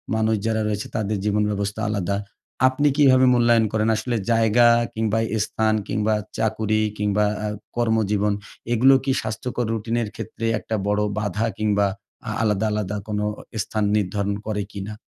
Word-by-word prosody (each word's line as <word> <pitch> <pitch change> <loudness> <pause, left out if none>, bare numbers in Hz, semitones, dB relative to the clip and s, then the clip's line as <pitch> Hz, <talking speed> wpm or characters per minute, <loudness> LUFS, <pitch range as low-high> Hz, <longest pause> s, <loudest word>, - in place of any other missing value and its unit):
মানুষ 110 0 +2
যারা 110 -1 +1
রয়েছে 105 0 -2
তাদের 105 -2 -1
জীবনব্যবস্থা 105 -1 0
আলাদা। 100 -2 -1 0.5
আপনি 145 +3 +1
কীভাবে 130 -3 +6
মূল্যায়ন 120 -2 +4
করেন 110 0 +1
আসলে 120 +3 -2 0.2
জায়গা 115 +1 +4 0.3
কিংবা 110 0 0 0.3
স্থান 110 -1 0
কিংবা 110 0 0 0.2
চাকুরি 110 0 0 0.2
কিংবা 105 0 +1 0.2
আ - - -1 0.3
কর্মজীবন, 105 -3 +1 0.4
এগুলো 130 +4 +6
কি 135 - 0
স্বাস্থ্যকর 120 +3 -3
রুটিনের 115 +1 -1
ক্ষেত্রে 115 - -6
একটা 110 - -3
বড় 105 0 +1 0.2
বাধা 105 +1 -1
কিংবা 105 -2 +2 0.4
আ - - -2
আলাদা, 105 0 +1
আলাদা 105 -1 -2
কোনো 105 -1 -1
ও - - -10 0.2
স্থান 110 -1 -2
নির্ধারণ 100 0 -1
করে 105 -1 -1
কি 100 - -6
না? 105 - -6
110 Hz, 150 wpm, -23 LUFS, 105-115 Hz, 0.5 s, কীভাবে